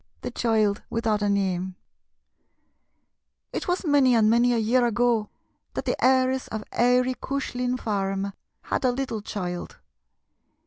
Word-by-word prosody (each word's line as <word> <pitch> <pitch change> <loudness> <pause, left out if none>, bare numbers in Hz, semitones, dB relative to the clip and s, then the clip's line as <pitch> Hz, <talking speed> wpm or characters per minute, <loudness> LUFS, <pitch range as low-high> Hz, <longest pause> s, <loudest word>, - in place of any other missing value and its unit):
THE - - -4
CHILD 215 -3 +1
WITHOUT 225 -2 0
A 205 - +1
NAME 190 -2 -1 1.8
It - - -3
was 355 +1 -1
many 280 -5 +4
and 220 -1 +4
many 240 +1 +4
a 240 - +2
year 235 +3 +2
ago 235 -2 +1 0.5
that - - -3
the - - 0
heiress 260 0 +3
of 220 -1 -5
Eary 250 +1 +3
Cushlin 250 -2 -2
Farm 195 -2 -2 0.3
had - - -2
a 255 - +3
little 245 -4 -3
child. 180 -4 -5
230 Hz, 135 wpm, -25 LUFS, 205-250 Hz, 1.8 s, many